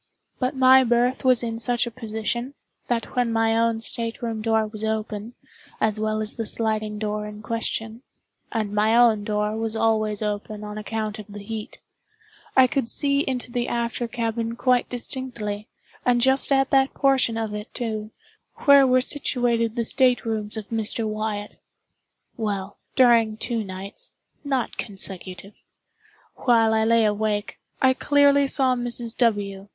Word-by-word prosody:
But 255 +2 -1
my 260 0 +7
berth 245 +1 +1
was 255 -2 +4
in 230 -1 -3
such 240 +1 0
a 235 - -5
position, 235 +3 -3 0.3
that 235 -1 -2
when 245 -2 +1
my 225 0 +2
own 230 0 +1
state 230 +1 -3
room 225 -2 -3
door 220 0 +2
was 215 0 -7
open, 220 +1 -3 0.4
as 215 -1 +1
well 215 0 0
as 215 - -1
the 225 - -2
sliding 215 -1 -2
door 210 0 -3
in 210 0 -10
question 225 0 -3 0.5
(and 215 -3 -2
my 215 +2 +3
own 225 -4 +5
door 210 0 -1
was 225 0 -2
always 215 -2 +1
open 210 0 -4
on 210 0 -6
account 215 0 -4
of 210 - -9
the 205 -1 -9
heat,) 220 +3 -6 0.8
I 260 - +8
could 255 -2 0
see 280 +2 +1
into 255 -3 -2
the 240 0 -1
after 235 0 -2
cabin 230 -1 -2
quite 250 0 +2
distinctly, 235 -4 -5 0.4
and 245 -1 +3
just 265 +3 +3
at 270 -1 +3
that 270 0 +3
portion 265 -4 +2
of 220 -2 -3
it, 210 0 -6
too, 215 -3 -4 0.6
where 280 -2 +8
were 255 0 +4
situated 240 -5 0
the 235 -2 -1
state 250 +1 +2
rooms 215 -1 -2
of 215 -2 -6
Mr. 225 0 0
Wyatt. 215 -1 -4 0.8
Well, 205 -3 -3 0.2
during 230 -4 +4
two 230 -1 -1
nights 190 0 -5 0.3
(not 270 -4 -2
consecutive) 195 -1 -6 0.8
while 225 -3 +3
I 220 0 +2
lay 230 0 +4
awake, 210 0 -1 0.2
I 260 0 +6
clearly 285 0 +4
saw 265 -2 +2
Mrs. 240 -1 -3
W. 205 -4 0
225 Hz, 155 wpm, -24 LUFS, 215-245 Hz, 0.8 s, I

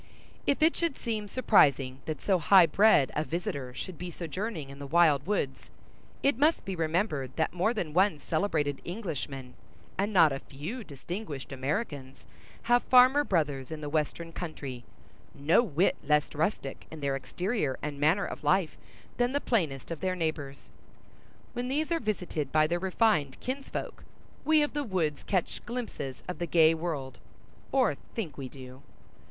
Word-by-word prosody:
If 285 +2 +2
it 320 - +5
should 335 -5 -1
seem 220 -3 -3
surprising 140 - +3
that 155 -4 -4
so 190 -3 +3
high 185 +3 +7
bred 180 -4 +4
a 150 - +1
visitor 150 -6 -4
should 185 +3 -6
be 180 - -5
sojourning 170 -2 -5
in 140 - -11
the 140 - -6
wild 155 -2 +4
woods, 170 -10 -2 0.5
it 275 -3 +2
must 310 +3 +3
be 195 - -3
remembered 160 - -1
that 160 - 0
more 180 +5 +2
than 180 -10 -3
one 185 -2 +3
celebrated 155 -4 -1
Englishman 145 - -5 0.5
and 200 +2 +1
not 165 -6 +6
a 135 - -2
few 160 - -7
distinguished 155 -1 -7
Americans 135 - -4 0.4
have 240 +1 +4
farmer 255 +3 +6
brothers 145 - 0
in 160 -1 -6
the 145 - -4
western 160 +2 -2
country, 140 -8 -6 0.5
no 145 +9 +4
whit 185 - +1
less 150 0 +2
rustic 150 -3 -2
in 160 -1 -9
their 140 -1 0
exterior 175 - -2
and 145 -1 -4
manner 160 +7 +3
of - - -7
life 190 -4 +2 0.4
than 245 +1 +1
the 285 - +2
plainest 165 - -1
of 165 - -4
their 185 -1 -1
neighbors. 155 -5 -4 0.8
When 245 0 -3
these 300 +5 -1
are 335 - +2
visited 180 - -3
by 155 0 +4
their 170 +3 0
refined 185 - +1
kinsfolk, 270 +2 -5 0.4
we 310 -1 +5
of 295 - -2
the 295 0 -1
woods 175 - -1
catch 185 -4 -1
glimpses 235 - -5
of 180 - -5
the 175 - -2
gay 165 -1 +5
world, 160 -5 -4 0.5
or 255 - +3 0.2
think 185 -10 -4
we 135 -2 -6
do. 130 -1 -11
165 Hz, 165 wpm, -29 LUFS, 145-210 Hz, 0.8 s, high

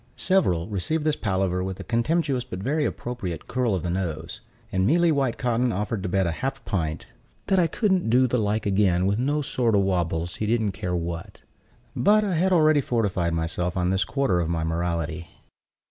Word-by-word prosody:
Several 90 - +2
received 110 - -1
this 155 -1 +1
palaver 95 -3 -1
with 95 0 -5
a - - -5
contemptuous 130 +2 0
but 120 -7 -7
very 145 +10 0
appropriate 120 -12 -4
curl 125 -5 0
of 90 - -3
the 85 - -1
nose; 80 -3 -4 0.3
and 95 +1 +1
Mealy 170 +3 +4
Whitecotton 125 -3 0
offered 105 +1 -2
to 95 - -3
bet 95 0 +1
a 85 - 0
half 135 +10 -4
pint 80 -5 -2 0.4
"that 190 - +2
I 170 - +4
couldn't 190 - +1
do 125 +3 +5
the 125 0 +1
like 105 +1 0
again 95 -3 +2
with 100 +3 +1
no 145 +4 0
sort 120 -5 +1
o' - - +4
wabbles, 90 -3 -1
he 105 - -2
didn't 110 -2 +1
care 95 -2 -3
what." 85 -1 -5 0.5
But 215 +1 +4
I 200 -3 -1
had 180 +3 +2
already 155 -4 +4
fortified 95 -9 0
myself 85 +2 -2
on 90 0 +1
this 95 0 +2
quarter 120 -6 0
of 85 -2 -1
my 85 -1 -1
morality. 85 0 -2
100 Hz, 190 wpm, -25 LUFS, 90-135 Hz, 0.5 s, do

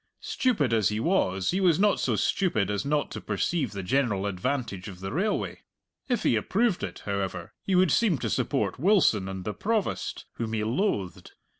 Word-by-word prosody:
Stupid 160 - +1
as 110 -4 +3
he 105 +1 -2
was, 95 - +1
he 190 - 0
was 175 -5 +4
not 205 0 +3
so - - +1
stupid 110 - +1
as 100 -1 -1
not 145 +1 0
to - - -6
perceive 150 - -1
the 100 -2 -5
general 105 -2 +1
advantage 100 0 -2
of 95 -3 -9
the 95 +1 -5
railway. 200 +8 -1 0.5
If 245 - 0
he - - +3
approved 195 - +1
it, - - -6
however, 95 -3 -3
he 190 - 0
would 180 -3 +4
seem 200 - +3
to - - -3
support - - 0
Wilson 150 - +3
and 95 -1 -6
the 105 - -2
Provost, 210 - -2
whom 115 -1 -3
he 110 -1 0
loathed. 110 - -2
120 Hz, 185 wpm, -27 LUFS, -, 0.5 s, was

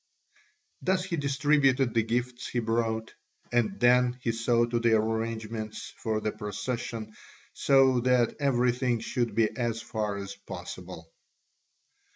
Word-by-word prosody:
Thus 185 0 +1
he 185 -2 -2
distributed 140 -3 +2
the 115 - +3
gifts 120 +2 -2
he - - -4
brought, 115 -1 -1 0.4
and 110 -5 +1
then 125 +1 +4
he 115 - +1
saw 115 +1 +2
to 120 0 -1
the 115 -1 +4
arrangements 110 0 -3
for 110 -1 -2
the 110 0 -1
procession 110 +1 -4 0.4
so 135 -2 +4
that 125 -1 +2
everything 125 -3 +1
should 120 0 -2
be 115 -2 +2
as 120 -2 -1
far 105 -3 -3
as 100 0 -6
possible. 90 -3 -9
115 Hz, 130 wpm, -28 LUFS, 110-125 Hz, 0.4 s, then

